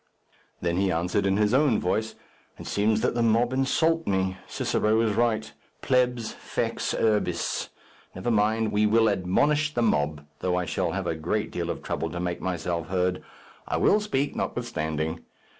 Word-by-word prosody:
Then 85 0 0
he 95 0 +2
answered 90 +4 0
in 95 0 +2
his 105 +1 +2
own 135 -4 +4
voice, 110 +5 -1 0.4
"It - - -9
seems 105 +1 +1
that - - +1
the 120 - 0
mob 115 +2 +3
insult 160 +5 +1
me. 95 -1 0
Cicero 110 +1 +1
is 110 -2 +1
right: 110 -2 0 0.3
plebs 125 -3 +1
fex - - -2
urbis. 110 -2 0 0.5
Never 95 +6 -2
mind; 110 +1 +2
we 105 +1 +3
will 115 +1 +4
admonish 145 +11 +2
the 120 - +2
mob, 75 -8 0
though 90 -1 0
I 90 0 0
shall 90 -2 -1
have 95 0 -2
a 85 - 0
great 95 +8 -2
deal 85 -1 -3
of - - -4
trouble - - -2
to 85 - -5
make 90 0 -3
myself 85 -2 -2
heard. 90 -1 0 0.5
I - - 0
will 210 - +4
speak, 145 -10 -1
notwithstanding. 80 -9 -2
105 Hz, 170 wpm, -26 LUFS, 90-120 Hz, 0.5 s, own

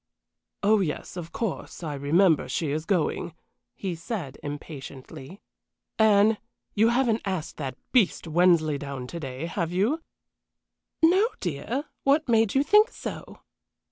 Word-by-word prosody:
"Oh 210 +1 +5
yes, 170 -3 -3
of 170 -2 -7
course, 220 -5 -4
I 155 -2 -3
remember 155 +2 +3
she 150 +2 -1
is 155 +2 -2
going," 170 -2 -1 0.4
he 190 -3 -3
said, 165 - -5
impatiently. 145 +2 -8 0.6
"Anne, 215 0 +5 0.3
you 220 +2 +4
haven't 235 -2 +2
asked 185 -6 -4
that 135 -4 -5
beast 230 -9 +2
Wensleydown 155 -6 +2
to 170 - -6
day, 135 0 -5
have 170 -1 -2
you?" 215 - +1 1.0
"No, 375 +7 +5
dear. 185 - -3 0.2
What 290 +3 +2
made 225 -2 +3
you 270 - +4
think 425 +8 +5
so?" - - -8
175 Hz, 130 wpm, -26 LUFS, 150-220 Hz, 1.0 s, Oh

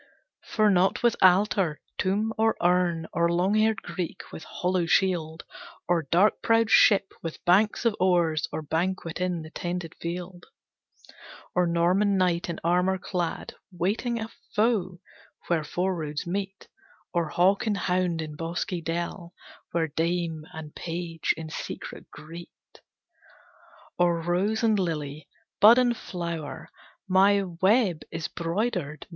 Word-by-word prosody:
For 215 -2 +2
not 190 +4 +2
with 240 -2 +4
altar, 185 -3 +4 0.2
tomb, 210 +4 0
or 225 0 +2
urn, 175 -2 +2
Or 170 0 +2
long 180 +4 +1
haired 220 0 +2
Greek 180 -3 -5
with 160 - -8
hollow 180 0 -1
shield, 165 -3 +1 0.4
Or 170 -4 +1
dark 195 +5 +3
prowed 225 -1 +2
ship 200 -1 +5
with 165 -2 -7
banks 205 +6 +3
of 230 -3 +3
oars, 175 -4 +2
Or 155 - -4
banquet 170 +2 -2
in 180 -3 -1
the 155 - -11
tented 175 -2 -4
field; 175 +1 -6 1.1
Or 180 0 +2
Norman 180 +4 +2
knight 180 -2 +1
in 170 - -4
armor 180 +3 +2
clad, 180 -2 -3 0.2
Waiting 215 +7 -1
a 220 0 -5 0.3
foe 205 -5 +1 0.5
where 165 -3 +1
four 180 +5 -1
roads 150 -3 -4
meet; 195 +2 -4 0.5
Or 170 -3 0
hawk 190 +8 +2
and 205 -2 +1
hound 180 -3 0
in 155 -1 -8
bosky 170 +2 -3
dell, 170 +2 -4 0.4
Where 165 -1 0
dame 165 0 -2
and 160 -3 -9
page 165 -1 -3
in 160 -1 -7
secret - - -7
greet; 165 +3 -10 1.5
Or 175 -1 +3
rose 185 +7 0
and 220 -2 +3
lily, 155 -4 -3 0.3
bud 225 +4 +8
and 245 -1 +3
flower, 170 -7 -6 0.4
My 195 +2 +4
web 190 0 +2
is 165 -1 -4
broidered. 170 -3 -3
175 Hz, 135 wpm, -26 LUFS, 165-195 Hz, 1.5 s, bud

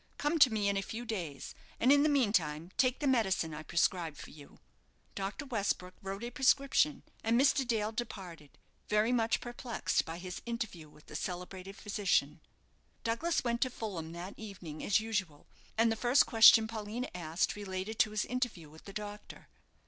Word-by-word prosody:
Come 295 +3 0
to 260 -5 +7
me 210 -2 0
in 200 0 +1
a - - +1
few 225 +4 -6
days, 170 - -5 0.3
and 250 - +4
in 285 0 +6
the 305 - +4
meantime 185 - +1
take 255 -1 +2
the - - 0
medicine 195 - +1
I 150 - -6
prescribe 170 -1 0
for - - -10
you." 145 -2 -14 0.6
Dr. 200 +9 -4
Westbrook 200 -7 -2
wrote 195 +3 -5
a 240 - -4
prescription, 275 +3 +3 0.2
and 230 +2 +3
Mr. 275 -1 +3
Dale 220 -2 0
departed, 190 - -7 0.3
very 210 +3 +3
much 230 -2 +2
perplexed 240 -1 -2
by 165 +1 -6
his 180 0 -7
interview 220 -10 -4
with 150 0 -19
the - - -11
celebrated 185 +3 -5
physician. 195 -8 0 0.6
Douglas 290 +9 0
went 235 -1 -1
to 255 - +2
Fulham 185 -10 -5
that 175 +3 -7
evening 185 -8 -8
as 205 - +3
usual, 205 -9 -3 0.3
and 225 0 +4
the - - +1
first 245 +4 +4
question 225 -1 +8
Paulina 225 +3 -4
asked 170 -1 -1
related 205 +2 -5
to 240 - +5
his 210 0 -1
interview 240 - -3
with 160 - -16
the 195 - -9
doctor. 210 0 -8
210 Hz, 175 wpm, -32 LUFS, 180-235 Hz, 0.6 s, question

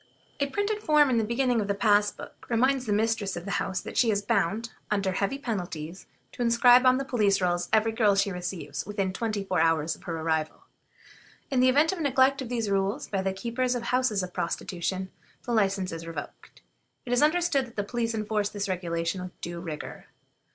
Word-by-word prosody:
A 280 - +1
printed 410 +7 -1
form 300 -6 +4
in 235 - +3
the - - +1
beginning 240 +1 +1
of 200 - -3
the 200 - 0
pass 205 -1 +3
book - - -12
reminds 255 +2 +2
the - - 0
mistress 215 -2 0
of 175 - -7
the 200 - -1
house 185 -2 -2
that - - -8
she 235 - +4
is 205 -1 +1
bound, 220 +1 0 0.2
under 200 -2 0
heavy 200 +8 -1
penalties, 180 - -5 0.2
to - - -8
inscribe 245 +2 +6
on 255 0 +5
the 275 - -3
police 210 -6 +2
rolls 175 -1 0
every 220 +1 +3
girl 215 -3 +3
she 195 0 +1
receives 175 -6 -5
within 195 -2 -2
twenty 215 0 -2
four 185 -3 -1
hours 160 -1 +2
of - - -19
her 165 -1 -3
arrival. 160 -1 -2 0.9
In 260 - +2
the 255 +1 +5
event 295 +5 +4
of 380 - -5
the - - -2
neglect 270 0 +3
of 250 - -6
these 235 -3 -1
rules 200 +7 0
by 195 -2 -1
the 190 0 0
keepers 240 +6 -1
of 240 - -3
houses 250 -5 +1
of 180 - -7
prostitution, 185 +2 -3 0.3
the 245 - -5
license 195 -4 +1
is 165 0 -7
revoked. 160 -3 -9 0.4
It 245 - -2
is 245 - +3
understood 305 -4 +2
that 235 - -17
the 205 - -1
police 230 +2 -2
enforce 210 -1 -1
this 205 -1 -4
regulation 170 -1 -2
with 180 0 -9
due 175 0 -5
rigor. 160 -4 -7
210 Hz, 210 wpm, -27 LUFS, 185-245 Hz, 0.9 s, inscribe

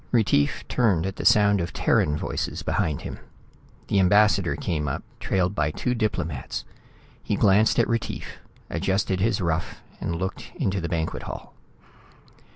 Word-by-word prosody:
Retief 100 - +2
turned 100 -9 +2
at 95 0 -4
the - - -5
sound 100 -2 +5
of 85 -1 -4
Terran 75 0 +2
voices - - -3
behind 75 -4 0
him. - - -6 0.7
The 100 - +2
ambassador 105 +3 +4
came 75 -3 -2
up, 65 - -3 0.2
trailed 90 0 0
by 75 -7 +1
two 125 +11 -1
diplomats. 110 -6 -2 0.6
He - - -1
glanced 100 +3 +4
at 120 - +4
Retief, 115 -1 -3 0.3
adjusted 95 +2 0
his 110 +2 +1
ruff 85 -1 -2 0.2
and 85 - -2
looked 95 +3 -5
into 95 0 -1
the 85 - -3
banquet 80 -2 -2
hall. - - -8
95 Hz, 150 wpm, -25 LUFS, 85-105 Hz, 0.7 s, sound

